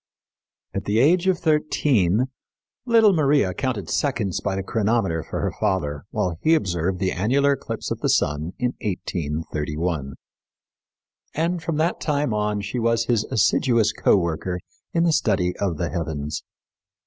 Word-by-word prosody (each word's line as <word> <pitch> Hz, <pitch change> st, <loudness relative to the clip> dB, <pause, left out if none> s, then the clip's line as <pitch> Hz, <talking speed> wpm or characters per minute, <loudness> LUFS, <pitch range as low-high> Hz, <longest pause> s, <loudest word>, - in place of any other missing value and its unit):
At 100 Hz, 0 st, -3 dB
the 105 Hz, +2 st, +1 dB
age 170 Hz, +9 st, +4 dB
of 185 Hz, -2 st, +3 dB
thirteen 135 Hz, -, +2 dB, 0.6 s
little 225 Hz, -3 st, +6 dB
Maria 145 Hz, -, +3 dB
counted 120 Hz, -, -2 dB
seconds 115 Hz, -, -1 dB
by 95 Hz, -, -1 dB
the 95 Hz, -, -2 dB
chronometer 105 Hz, -5 st, 0 dB
for -, -, -5 dB
her -, -, 0 dB
father 75 Hz, -6 st, -1 dB
while 90 Hz, -6 st, -2 dB
he 160 Hz, +1 st, +4 dB
observed 90 Hz, -, -1 dB
the 95 Hz, +1 st, 0 dB
annular 135 Hz, +10 st, +2 dB
eclipse 140 Hz, -, -5 dB
of -, -, -2 dB
the -, -, 0 dB
sun 75 Hz, +4 st, +1 dB
in 125 Hz, 0 st, -1 dB
1831; 80 Hz, -4 st, -3 dB, 1.2 s
and 170 Hz, +2 st, 0 dB
from 160 Hz, -1 st, -2 dB
that 165 Hz, +3 st, 0 dB
time 145 Hz, -5 st, 0 dB
on 105 Hz, -1 st, 0 dB
she 100 Hz, +5 st, -3 dB
was 115 Hz, 0 st, +1 dB
his 115 Hz, -3 st, +1 dB
assiduous 115 Hz, -1 st, +2 dB
co -, -, +3 dB
worker 90 Hz, +1 st, -2 dB, 0.3 s
in 170 Hz, -, +2 dB
the 170 Hz, -2 st, +3 dB
study 95 Hz, -9 st, +1 dB
of 95 Hz, -6 st, -1 dB
the 85 Hz, -, -2 dB
heavens. 80 Hz, -3 st, -3 dB
105 Hz, 150 wpm, -23 LUFS, 90-140 Hz, 1.2 s, little